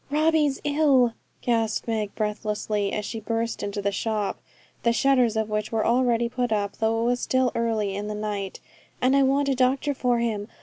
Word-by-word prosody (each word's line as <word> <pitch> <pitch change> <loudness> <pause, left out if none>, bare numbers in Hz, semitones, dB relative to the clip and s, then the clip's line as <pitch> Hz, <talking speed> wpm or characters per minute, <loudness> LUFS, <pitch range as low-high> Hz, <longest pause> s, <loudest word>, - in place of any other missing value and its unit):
'Robbie's 300 -1 +2
very 290 0 -1
ill,' 265 -6 +4 0.3
gasped 225 -2 0
Meg, 215 -3 -2
breathlessly, 210 -1 -2
as 210 - -2
she 225 - -4
burst 230 +1 -2
into 205 0 -3
the 200 - +1
shop, 210 0 -2 0.4
the 235 - +3
shutters 250 -3 +3
of 220 -1 0
which 210 -1 -2
were 220 -1 0
already 240 -1 +2
put 245 0 -2
up, 200 -2 -1
though 225 0 +1
it - - 0
was 245 +1 +1
still 260 0 +1
early 220 -4 -1
in 205 +1 -4
the 210 - -4
night, 205 -2 -4 0.4
'and 260 +2 +3
I 275 - +5
want 275 +1 +2
a 275 - +2
doctor 265 +3 +1
for 250 -2 +1
him. 220 -3 -1
230 Hz, 200 wpm, -25 LUFS, 210-255 Hz, 0.4 s, I